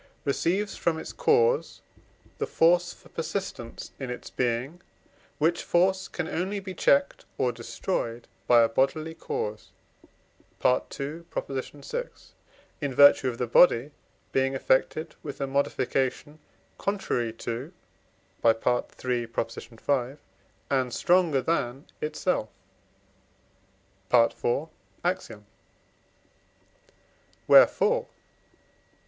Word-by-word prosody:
receives 180 +8 0
from 165 -2 0
its - - -7
cause 470 0 +2 0.6
the - - -1
force 175 +1 +3
for - - -17
persistence 165 -8 -5
in 135 -2 -5
its 125 - -7
being; 125 +7 -2 0.6
which 165 +3 +1
force 190 +2 +2
can 175 -3 -4
only 190 +4 -2
be 190 -1 -7
checked 280 +10 +2
or 125 - +1
destroyed 115 0 -4 0.2
by 120 -1 +7
a - - +4
bodily 135 +7 0
cause 105 -8 -4 1.0
(II. 140 +5 0
vi.), 140 - -4 0.8
in 140 -3 -2
virtue 140 -1 +7
of 120 - -6
the 125 - -1
body 120 +2 +5 0.4
being 135 0 +1
affected 135 +4 +1
with 145 -3 -7
a 140 - 0
modification 140 +1 -1 0.4
contrary 160 - -1
to 120 +6 -5 0.7
(III. 115 - +6 0.7
v.) 120 +3 -3 0.6
and 130 -2 +1
stronger 175 -6 +3
than 135 -5 -1 0.2
itself 150 - -1 1.6
(IV. 120 +4 +2 0.4
Ax.); 185 +2 -1 2.2
wherefore - - +6
(II. - - -22
140 Hz, 95 wpm, -27 LUFS, 125-175 Hz, 2.2 s, by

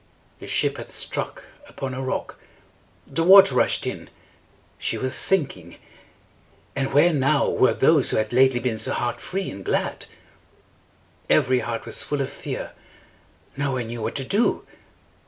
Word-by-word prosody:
The - - -10
ship - - 0
had - - -8
struck - - -3 0.3
upon 135 -2 -5
a 130 - -4
rock. 130 - -4 0.7
The 165 +4 -2
water 190 -4 +8
rushed 125 - +1
in. - - -5 0.7
She - - -2
was 130 0 -2
sinking. 130 - 0 1.0
Ah, 135 -1 0
where 150 +5 +3
now 140 0 +2
were 130 - +2
those 145 -1 +3
who - - 0
had 110 +1 -1
lately 130 0 +4
been 115 -2 -2
so 110 - 0
heart 120 0 -2
free 190 +1 -4
and 95 0 -9
glad? - - -2 1.2
Every 130 -4 +3
heart 115 -1 -4
was 115 - -2
full 145 - -2
of 135 - -3
fear. - - -6 0.8
No 140 -1 -1
one 125 -2 -2
knew 115 0 -6
what - - -3
to 135 - -2
do. 205 - 0
130 Hz, 155 wpm, -23 LUFS, 120-145 Hz, 1.2 s, water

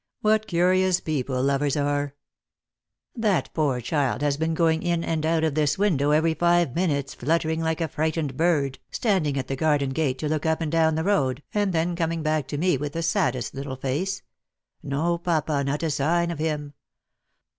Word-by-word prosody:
" - - -62
What 215 0 +2
curious 185 +1 +3
people 130 -5 -2
lovers 140 +1 +1
are! 145 0 -1 1.0
That 215 -6 0
poor 145 -6 +1
child 140 +2 0
has 145 -1 +2
been 160 +2 -1
going 160 -1 +2
in 170 -1 0
and 160 -2 -1
out 165 -1 +1
of 160 -2 +1
this 150 -1 +1
window 165 -8 +2
every 160 +2 +3
five 170 -4 +2
minutes, 145 -5 -1
fluttering 160 +3 0
like 160 0 -1
a 165 - +1
frightened 155 -3 -2
bird, 145 -4 +1
standing 180 - 0
at 135 - -3
the 135 - -2
garden 145 -2 +1
gate 135 -2 0
to 150 - -3
look 155 +1 -1
up 160 0 +1
and 160 -2 -2
down 160 -1 +3
the 160 - -1
road, 145 -8 +1
and 205 -2 +1
then 170 +1 0
coming 165 -1 -1
back 155 -3 0
to 145 - -4
me 175 -1 +2
with 145 +1 -4
the 165 - -2
saddest 135 - 0
little 135 0 -5
face 150 +10 -2 0.2
— - - -63
' - - -63
No, 165 +5 -1
papa, 155 -4 0
not 145 +3 -2
a 160 - 0
sign 170 +5 +1
of 165 - -6
him.' 150 -2 -2
155 Hz, 200 wpm, -25 LUFS, 140-170 Hz, 1.0 s, curious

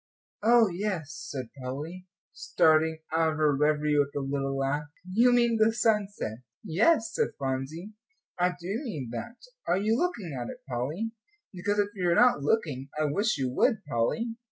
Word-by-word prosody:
Oh, 230 +1 +5
yes," 180 -4 -3 0.2
said 130 -4 -5
Polly, 155 +8 -6 0.3
starting 160 0 +2
out 160 -1 +2
of - - -6
her 150 -2 +3
revery 150 +1 +2
with 145 0 0
a - - 0
little 135 0 -2
laugh, 140 +2 -1 0.2
"you 230 +7 +4
mean 235 -1 +3
the 220 +1 +5
sunset?" 210 - 0 0.2
"Yes," 220 - +2
said 460 - -1
Phronsie, 135 +9 -4 0.5
"I 180 0 +2
do 190 +6 -3
mean 150 - -5
that. 235 - -6 0.3
Are - - +3
you 215 +3 +1
looking 235 - -2
at 120 -2 -4
it, - - -10
Polly? 145 - -3 0.4
Because 205 +3 -1
if 205 -1 +2
you 180 -3 0
are 170 - +3
not 245 - +5
looking, 145 - 0
I 155 - +2
wish 205 +6 +1
you 130 -2 -1
would, 220 - +1
Polly." 225 - -1
170 Hz, 170 wpm, -28 LUFS, 140-215 Hz, 0.5 s, Oh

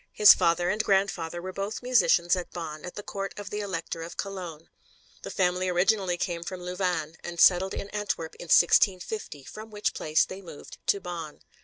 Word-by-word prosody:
His 210 - +9
father 175 +2 +2
and 215 +2 0
grandfather 190 -4 0
were 185 0 -5
both 200 +5 -4
musicians 180 -8 +4
at 180 -1 -5
Bonn, 155 -3 -7
at 180 - -8
the 205 - -6
Court 195 -1 -5
of 205 -1 -7
the 210 - -3
Elector 170 -5 -4
of 165 +1 -8
Cologne. 180 -5 -6 0.5
The - - -7
family 185 0 0
originally 180 0 +2
came 170 -1 -2
from 180 +1 -6
Louvain, 180 -4 -2
and 175 -1 -6
settled 190 +1 +5
in - - -5
Antwerp 205 -6 -3
in - - -7
1650, 180 -2 +3
from 215 +9 -10
which 210 -1 -2
place 155 0 +2
they 190 +1 -9
moved 170 -6 -11
to 200 - +3
Bonn. 170 -5 -7
180 Hz, 185 wpm, -27 LUFS, 170-195 Hz, 0.5 s, His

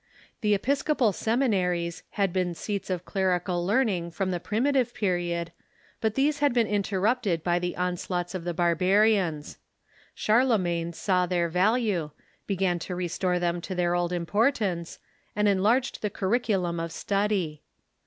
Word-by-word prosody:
The 210 -1 +3
episcopal 270 +1 +1
seminaries 185 -8 0 0.2
had 195 -3 +1
been 180 -2 0
scats 200 +3 -4
of 180 -1 -3
clerical 180 -2 0
learning 195 -4 +1
from 185 +3 -2
the 175 - -1
primitive 245 +5 0
period, 175 -4 -1 0.5
but 220 -1 -1
these 290 +2 +1
had 285 -4 +2
been 235 -2 +4
interrupted 205 -2 0
by 175 0 +1
the 175 0 -3
onslaughts 180 0 -2
of 185 -3 -4
the 175 - -2
barbarians. 180 -1 +2 0.6
Charlemagne 190 -8 +1
saw 180 +2 +1
their 175 -1 0
value, 195 -2 +1 0.4
began 185 -3 0
to 180 +2 -5
restore 180 +1 -1
them 175 0 -1
to 185 - -5
their 175 -1 +1
old 175 0 0
importance, 185 -1 0 0.4
and 210 0 +2
enlarged 215 +7 +2
the 210 - -1
curriculum 190 -4 0
of 165 0 -4
study. 195 -5 -1
185 Hz, 140 wpm, -27 LUFS, 175-215 Hz, 0.6 s, been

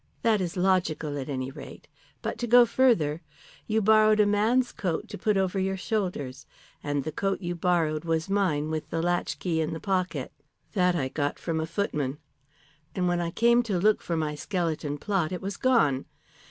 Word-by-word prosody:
"That 220 -3 +3
is 180 0 -3
logical, 180 -5 +1
at 135 - -6
any 130 -1 -3
rate. - - -11 0.4
But - - -3
to 240 - -2
go 245 +1 +7
further. 175 - +2 0.5
You 220 0 +1
borrowed 215 0 +5
a 210 - +6
man's 220 +5 +2
coat 175 -5 -3
to - - -6
put 210 +1 +1
over 190 0 0
your 190 0 -1
shoulders. 180 - -3 0.4
And 145 -1 -1
the 155 - -4
coat 195 +5 -1
you 175 -1 -2
borrowed 165 -3 0
was 165 -1 -1
mine 170 -7 0
with 155 -1 -4
the 165 - -2
latchkey 175 -1 -1
in 155 - -2
the 165 - -5
pocket. 185 -2 -2 0.4
That 180 -3 +2
I 135 -6 0
got 145 +1 -2
from 165 -2 -2
a 160 - -2
footman. 150 -6 -2 0.8
And 180 -1 0
when 175 0 +1
I 170 - -1
came 235 +6 +4
to 215 -6 -2
look 210 +4 +3
for 170 - -2
my 155 -2 -1
skeleton 155 -3 -2
plot, 185 0 -1
it 180 - -3
was 195 +1 -4
gone. 150 - +2
175 Hz, 190 wpm, -27 LUFS, 155-205 Hz, 0.8 s, go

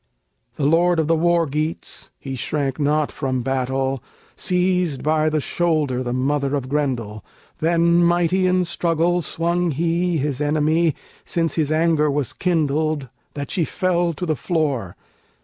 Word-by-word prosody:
The 140 - -1
lord 170 +3 +3
of 160 -2 +1
the 165 - +3
War 170 +1 +2
Geats 155 +3 -4
(He 135 - -7
shrank 135 +1 -2
not 150 +1 +1
from 130 -3 -2
battle) 135 0 -1 0.3
seized 180 -5 0
by 155 0 +2
the 155 0 0
shoulder 150 -5 0
The 120 -1 -3
mother 140 +2 0
of 135 -3 -3
Grendel; 125 -7 -2 0.4
then 170 +1 +3
mighty 175 +2 +2
in 180 0 +2
struggle 170 +1 +1
Swung 170 +2 0
he 170 +3 0
his 145 -1 -2
enemy, 155 +2 +2 0.3
since 165 -1 -1
his 155 -2 0
anger 155 -1 +2
was 140 -2 -1
kindled, 155 -4 0 0.3
That 140 -2 -5
she 175 - +1
fell 175 0 0
to 180 - -4
the 155 -2 0
floor. 140 - -1
155 Hz, 150 wpm, -21 LUFS, 140-170 Hz, 0.4 s, lord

